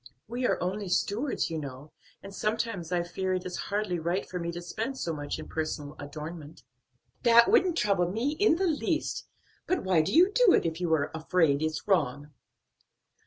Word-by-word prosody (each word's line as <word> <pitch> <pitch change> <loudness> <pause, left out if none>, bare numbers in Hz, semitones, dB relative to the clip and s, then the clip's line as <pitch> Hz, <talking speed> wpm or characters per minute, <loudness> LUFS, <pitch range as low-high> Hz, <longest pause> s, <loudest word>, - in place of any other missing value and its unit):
We 245 +3 -1
are - - +1
only 195 +2 -3
stewards, 210 - 0
you 160 - -2
know, 140 0 -8 0.3
and 195 0 -9
sometimes 215 -5 -2
I 175 -1 +1
fear 185 +2 -2
it 180 - -4
is 180 -1 -4
hardly 200 -4 -1
right 170 +4 -1
for 180 - -5
me 170 0 -3
to 175 - -5
spend 220 +9 -4
so 165 - -2
much 145 -1 -4
in - - -8
personal 155 -2 -4
adornment." 150 +2 -8 0.6
"That 235 +5 +6
wouldn't 375 -7 +4
trouble 195 - +2
me 235 +8 0
in 405 -5 +5
the 380 +3 0
least; 320 0 -1 0.4
but 370 - 0
why 185 -4 +3
do 155 - -2
you 360 +5 +5
do 455 -2 +5
it, - - +3
if 165 +1 -2
you 175 -2 0
are 145 -2 -1
afraid 160 -2 +2
it's 155 +3 -2
wrong?" 145 -6 +1
180 Hz, 190 wpm, -28 LUFS, 160-230 Hz, 0.6 s, That